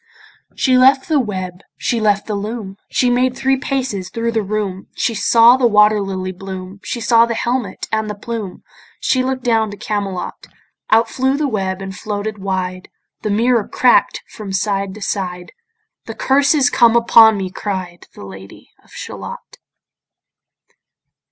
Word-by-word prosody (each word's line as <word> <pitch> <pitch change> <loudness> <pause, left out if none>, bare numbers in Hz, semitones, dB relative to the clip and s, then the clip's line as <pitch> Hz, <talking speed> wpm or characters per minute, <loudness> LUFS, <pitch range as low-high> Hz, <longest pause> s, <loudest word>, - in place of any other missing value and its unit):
She 255 -2 +3
left 265 +1 +4
the 310 -3 +2
web, 185 -6 -4 0.2
she 235 - -1
left 205 -2 +1
the 215 - -4
loom, 205 -1 -5
She 250 - +1
made 250 +1 +1
three 270 0 +2
paces 260 -9 -3
thro' 230 0 -2
the 225 -1 0
room, 200 -2 -4
She 235 - 0
saw 230 +3 +5
the 255 -2 +3
water 210 -1 +4
lily 190 -1 -4
bloom, 190 +1 -8
She 240 - -4
saw 230 0 +4
the 230 - -2
helmet 240 0 -2
and 220 -1 -1
the 210 - -4
plume, 210 -2 -6 0.4
She 255 -1 +1
look'd 260 -1 -3
down 225 -3 +1
to 205 - -9
Camelot. 200 -4 -4 0.4
Out 225 +1 +4
flew 265 +1 0
the 300 0 0
web 195 -5 -2
and 195 0 -7
floated 210 +2 -4
wide; 185 -1 -3 0.3
The 215 - -3
mirror 230 +1 +2
crack'd 250 - +3
from 210 -3 -9
side 195 0 -1
to 215 - -8
side; 180 -3 -4 0.6
"The - - -6
curse 280 +3 +2
is 275 -4 +3
come 235 -1 +4
upon 230 -2 +6
me," 190 -2 -4
cried 185 -4 -5
The - - -10
Lady 95 0 -12
of - - -25
Shalott. - - -9
215 Hz, 165 wpm, -18 LUFS, 195-240 Hz, 0.6 s, upon